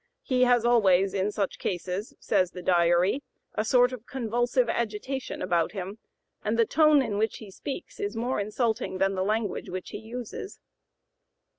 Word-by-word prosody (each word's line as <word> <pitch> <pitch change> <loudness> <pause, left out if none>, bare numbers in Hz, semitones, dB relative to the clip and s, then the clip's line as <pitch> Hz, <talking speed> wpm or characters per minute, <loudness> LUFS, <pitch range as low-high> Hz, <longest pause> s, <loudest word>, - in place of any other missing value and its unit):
He 255 -2 +3
has 245 -2 +3
always 195 -5 +4
in 200 +1 0
such 200 -2 -2
cases," 185 +3 -3
says 185 -4 +2
the 180 0 -9
Diary, 175 +7 +3 0.3
"a - - 0
sort 245 +3 +4
of 240 -2 -8
convulsive 240 0 0
agitation 235 +4 -3
about 175 -1 +1
him, 195 +2 -6 0.4
and 215 +2 0
the 230 - +5
tone 305 +1 +5
in 210 -4 -2
which 220 0 0
he 210 -3 -11
speaks 320 - -7
is 410 0 -3
more 245 +2 -1
insulting 215 -1 -1
than 195 +1 +2
the 185 -1 -1
language 210 0 -1
which 185 0 -5
he - - -5
uses." 240 - -7
215 Hz, 165 wpm, -27 LUFS, 190-245 Hz, 0.4 s, the